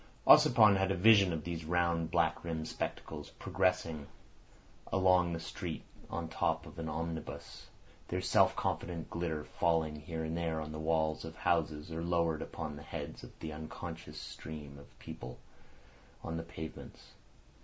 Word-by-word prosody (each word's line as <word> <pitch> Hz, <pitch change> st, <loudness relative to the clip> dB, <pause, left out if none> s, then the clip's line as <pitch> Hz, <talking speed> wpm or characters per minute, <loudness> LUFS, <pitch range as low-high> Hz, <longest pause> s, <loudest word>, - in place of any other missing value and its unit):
Ossipon 105 Hz, -2 st, +8 dB
had 95 Hz, 0 st, +2 dB
a 95 Hz, -, +2 dB
vision 100 Hz, 0 st, +7 dB
of 80 Hz, -2 st, -2 dB
these 85 Hz, -1 st, -4 dB
round 85 Hz, 0 st, +1 dB
black 85 Hz, -1 st, +2 dB
rimmed 80 Hz, -2 st, -3 dB
spectacles 75 Hz, -2 st, -4 dB
progressing 80 Hz, -5 st, 0 dB, 0.8 s
along 90 Hz, -2 st, +4 dB
the 85 Hz, -, -2 dB
streets 80 Hz, -, -5 dB, 0.2 s
on 85 Hz, -, -3 dB
the 80 Hz, -, -9 dB
top -, -, +1 dB
of -, -, -10 dB
an 80 Hz, -1 st, -3 dB
omnibus, 80 Hz, 0 st, -5 dB, 0.4 s
their -, -, -1 dB
self -, -, +4 dB
confident 85 Hz, -2 st, -2 dB
glitter 80 Hz, -3 st, -2 dB
falling 80 Hz, -3 st, +1 dB
here 80 Hz, +1 st, -4 dB
and 80 Hz, +1 st, -2 dB
there 85 Hz, -2 st, -1 dB
on 75 Hz, 0 st, -5 dB
the 75 Hz, -, -5 dB
walls 80 Hz, -1 st, +1 dB
of 80 Hz, 0 st, -7 dB
houses 80 Hz, -3 st, 0 dB
or 80 Hz, +1 st, -3 dB
lowered 85 Hz, -2 st, +1 dB
upon 80 Hz, -2 st, -5 dB
the -, -, -9 dB
heads -, -, -6 dB
of -, -, -8 dB
the 80 Hz, -1 st, -4 dB
unconscious 80 Hz, +2 st, -7 dB
stream 75 Hz, -3 st, -8 dB
of 70 Hz, -, -17 dB
people 65 Hz, -, -8 dB, 0.9 s
on 80 Hz, -, -3 dB
the 80 Hz, -, -2 dB
pavements. 80 Hz, -1 st, -9 dB
80 Hz, 160 wpm, -34 LUFS, 80-85 Hz, 0.9 s, Ossipon